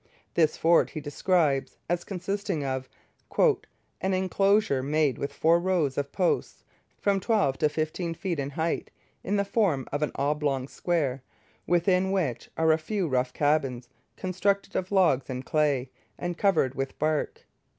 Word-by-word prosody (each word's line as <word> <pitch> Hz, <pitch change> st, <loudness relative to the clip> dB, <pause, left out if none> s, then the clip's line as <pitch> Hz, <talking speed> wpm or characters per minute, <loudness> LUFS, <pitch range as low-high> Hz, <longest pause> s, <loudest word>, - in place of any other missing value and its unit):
This 160 Hz, -2 st, +2 dB
fort 165 Hz, +1 st, +4 dB
he 155 Hz, -, -6 dB
describes 145 Hz, -1 st, 0 dB
as 175 Hz, +1 st, -1 dB
consisting 195 Hz, -4 st, -3 dB
of 130 Hz, -1 st, -3 dB, 0.5 s
'an -, -, +4 dB, 0.6 s
enclosure 195 Hz, -4 st, +2 dB
made 145 Hz, -1 st, +1 dB
with 140 Hz, -, -3 dB
four 165 Hz, +2 st, +3 dB
rows 170 Hz, -7 st, +1 dB
of 140 Hz, 0 st, -2 dB
posts, 180 Hz, -3 st, -1 dB, 0.3 s
from 200 Hz, -1 st, +1 dB
twelve 180 Hz, -, +1 dB
to 150 Hz, -, +3 dB
fifteen 160 Hz, +2 st, -2 dB
feet 175 Hz, -3 st, -3 dB
in 140 Hz, 0 st, -2 dB
height, 160 Hz, +3 st, -2 dB, 0.3 s
in 205 Hz, -, -1 dB
the 200 Hz, 0 st, +1 dB
form 195 Hz, -, +1 dB
of 145 Hz, -, -2 dB
an 150 Hz, -, 0 dB
oblong 140 Hz, -2 st, 0 dB
square, 140 Hz, -6 st, -1 dB, 0.5 s
within 180 Hz, +2 st, +2 dB
which 160 Hz, -12 st, -1 dB
are 160 Hz, 0 st, +4 dB
a 160 Hz, -, +3 dB
few 185 Hz, +3 st, -2 dB
rough 125 Hz, -2 st, 0 dB
cabins 135 Hz, -5 st, 0 dB, 0.3 s
constructed 195 Hz, +2 st, -1 dB
of 185 Hz, +1 st, -2 dB
logs 165 Hz, -10 st, +3 dB
and 130 Hz, 0 st, -4 dB
clay, 140 Hz, -5 st, +1 dB, 0.3 s
and 175 Hz, 0 st, -3 dB
covered 180 Hz, -10 st, +2 dB
with 135 Hz, 0 st, -4 dB
bark.' 155 Hz, 0 st, -1 dB
155 Hz, 150 wpm, -27 LUFS, 140-185 Hz, 0.6 s, fort